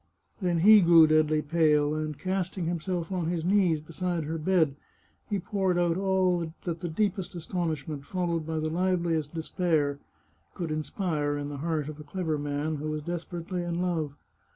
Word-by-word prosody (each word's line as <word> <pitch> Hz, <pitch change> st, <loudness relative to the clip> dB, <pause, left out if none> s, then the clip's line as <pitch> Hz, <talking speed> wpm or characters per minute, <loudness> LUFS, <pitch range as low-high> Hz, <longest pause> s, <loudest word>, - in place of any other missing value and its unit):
Then 175 Hz, -3 st, +1 dB
he 210 Hz, +2 st, +8 dB
grew 170 Hz, -2 st, +8 dB
deadly 155 Hz, 0 st, +3 dB
pale, 150 Hz, -2 st, +3 dB
and, 155 Hz, -1 st, -3 dB
casting 185 Hz, -1 st, -2 dB
himself 170 Hz, +1 st, -2 dB
on 180 Hz, -3 st, -1 dB
his 170 Hz, -1 st, -1 dB
knees 185 Hz, -4 st, +3 dB
beside 165 Hz, +2 st, -3 dB
her 160 Hz, +2 st, -3 dB
bed, 160 Hz, -4 st, +2 dB, 0.5 s
he 205 Hz, -, 0 dB
poured 190 Hz, -1 st, 0 dB
out 175 Hz, -1 st, +2 dB
all 185 Hz, -3 st, +1 dB
that 170 Hz, -2 st, -3 dB
the 175 Hz, -, -4 dB
deepest 190 Hz, +1 st, -1 dB
astonishment, 155 Hz, -4 st, -3 dB
followed 170 Hz, -1 st, -1 dB
by 160 Hz, +1 st, -3 dB
the 155 Hz, 0 st, -1 dB
liveliest 170 Hz, -3 st, 0 dB
despair, 155 Hz, -3 st, 0 dB, 0.6 s
could 170 Hz, -3 st, -3 dB
inspire 155 Hz, -2 st, -1 dB
in 145 Hz, 0 st, -4 dB
the 145 Hz, -, -5 dB
heart 155 Hz, 0 st, -1 dB
of 155 Hz, 0 st, -7 dB
a -, -, -8 dB
clever 160 Hz, -2 st, -2 dB
man 145 Hz, +2 st, -2 dB
who 150 Hz, +2 st, -4 dB
was 155 Hz, -1 st, -3 dB
desperately 175 Hz, +2 st, -4 dB
in 175 Hz, 0 st, -2 dB
love. 165 Hz, -5 st, -1 dB
165 Hz, 170 wpm, -28 LUFS, 155-180 Hz, 0.6 s, he